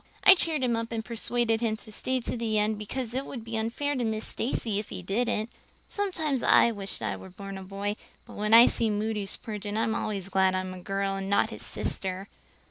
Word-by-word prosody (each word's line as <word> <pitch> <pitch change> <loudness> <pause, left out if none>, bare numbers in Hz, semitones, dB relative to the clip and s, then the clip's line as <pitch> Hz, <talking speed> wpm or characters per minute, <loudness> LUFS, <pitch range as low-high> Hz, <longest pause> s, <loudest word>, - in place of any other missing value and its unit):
I 390 - +11
cheered 320 -6 0
him 240 -2 +2
up 230 +1 -3
and 225 -1 -3
persuaded 235 -1 0
him 220 -2 0
to 215 - -10
stay 260 +4 0
to - - -2
the 225 -2 0
end 210 0 +1
because 235 +3 -4
it 265 +2 -1
would 245 -4 -7
be 225 0 -5
unfair 230 +6 -1
to 250 - -1
Miss 220 -1 -1
Stacy 225 -4 -1
if 210 - -6
he 185 - -6
didn't. 220 +3 0 0.4
Sometimes 320 - -1
I - - +6
have 235 -1 0
wished 195 - -5
I 100 -2 -1
was 180 - -11
born 195 0 -7
a 190 - -6
boy, 200 +2 -3 0.3
but - - -12
when 210 +1 -2
I 230 +2 +10
see 225 - +2
Moody 210 -1 -1
Spurgeon 210 0 -4
I'm 225 0 +1
always 200 -4 -3
glad 190 -1 +3
I'm 185 0 -2
a 185 - -8
girl 195 +2 -1
and 195 0 -4
not 200 - +3
his - - -8
sister. 190 +1 -3
220 Hz, 225 wpm, -28 LUFS, 195-235 Hz, 0.4 s, I